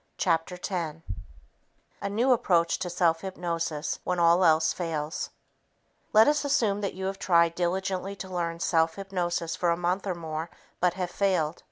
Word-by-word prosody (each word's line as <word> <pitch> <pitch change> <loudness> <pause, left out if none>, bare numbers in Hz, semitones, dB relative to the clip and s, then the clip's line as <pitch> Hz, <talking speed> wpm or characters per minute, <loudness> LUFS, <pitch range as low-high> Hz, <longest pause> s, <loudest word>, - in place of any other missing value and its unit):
Chapter 175 -1 0
10 165 -4 -4 1.0
A 200 - -2
New 235 +6 +2
Approach 175 -8 +2
to 180 - -3
Self 170 -2 +2
Hypnosis 170 -4 -3
When 180 - -1
All 170 +1 +5
Else 160 -1 +4
Fails 160 -2 -3 0.8
Let 215 +1 +7
us 295 0 +3
assume 215 -8 +1
that 200 - -3
you 190 0 -4
have 195 0 -3
tried 170 -3 +3
diligently 190 +2 -2
to 190 - -7
learn 170 -2 -3
self 165 -1 +2
hypnosis 175 -4 -2
for 175 - 0
a 170 - +2
month 180 +3 -1
or 185 - -1
more 160 -1 -5 0.3
but 180 0 +2
have 180 -2 -3
failed. 175 -5 0
175 Hz, 165 wpm, -27 LUFS, 165-190 Hz, 1.0 s, Let